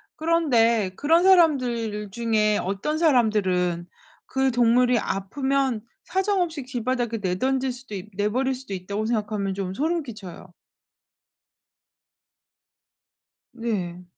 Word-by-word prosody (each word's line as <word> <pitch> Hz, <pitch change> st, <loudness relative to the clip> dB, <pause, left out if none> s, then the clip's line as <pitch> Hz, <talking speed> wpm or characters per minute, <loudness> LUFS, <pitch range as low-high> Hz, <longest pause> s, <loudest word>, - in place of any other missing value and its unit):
그런데 240 Hz, -, +2 dB
그런 325 Hz, -, +3 dB
사람들 250 Hz, -, +3 dB
중에 215 Hz, -1 st, +1 dB
'어떤 200 Hz, +12 st, -2 dB
사람들은 200 Hz, -, +2 dB, 0.4 s
그 265 Hz, 0 st, 0 dB
동물이 245 Hz, 0 st, +3 dB
아프면 265 Hz, +5 st, -1 dB, 0.2 s
사정없이 370 Hz, -6 st, -1 dB
길바닥에 245 Hz, -2 st, -2 dB
내던질 260 Hz, +8 st, 0 dB
수도 245 Hz, -3 st, -9 dB
있 195 Hz, +2 st, -7 dB
내버릴 235 Hz, +7 st, 0 dB
수도 255 Hz, -5 st, -8 dB
있다.'고 200 Hz, +3 st, -3 dB
생각하면 210 Hz, -3 st, -1 dB
좀 190 Hz, -1 st, -4 dB
소름 320 Hz, -, -1 dB
끼쳐요. 190 Hz, -7 st, -10 dB, 3.0 s
네. 195 Hz, -7 st, -4 dB
235 Hz, 235 characters per minute, -24 LUFS, 205-270 Hz, 3.0 s, 그런